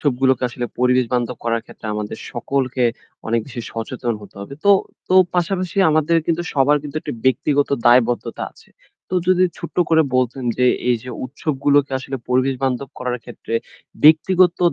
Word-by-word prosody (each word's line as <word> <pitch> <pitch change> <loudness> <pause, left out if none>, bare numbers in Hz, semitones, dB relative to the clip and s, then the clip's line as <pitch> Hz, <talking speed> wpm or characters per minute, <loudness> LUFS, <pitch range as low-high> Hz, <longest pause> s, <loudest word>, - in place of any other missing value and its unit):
উৎসবগুলোকে 130 -2 +1
আসলে 120 0 -4
পরিবেশ 125 0 +3
বান্ধব 125 -1 -1
করার 115 -1 -1
ক্ষেত্রে - - -11
আমাদের 105 -1 -4
সকলকে 130 +1 -1 0.4
অনেক 115 0 +2
বেশি 120 -3 -6
সচেতন 115 +1 -3
হতে 100 - -14
হবে। 100 +7 -8
তো 200 - +6 0.4
তো, 185 - +2 0.2
পাশাপাশি 180 0 -1
আমাদের 155 +2 +2
কিন্তু 170 +1 0
সবার 145 +2 +4
কিন্তু 150 0 -7
একটি - - -5
ব্যক্তিগত 140 +2 +2 0.2
দায়বদ্ধতা 120 0 +3
আছে। - - -21 0.4
তো - - -4
যদি 185 0 +4
ছোট্ট 170 - -8
করে 160 0 +5
বলতেন 130 +1 0
যে 125 - +4 0.2
এই 125 - +4
যে 125 - -8
উৎসবগুলোকে 140 +1 0
আসলে 135 +1 -5
পরিবেশ 130 +2 +2
বান্ধব 130 +1 -1
করার 125 -1 -2
ক্ষেত্রে 120 -1 -7 0.5
ব্যক্তিগত 175 +3 +5
130 Hz, 160 wpm, -20 LUFS, 125-150 Hz, 0.5 s, তো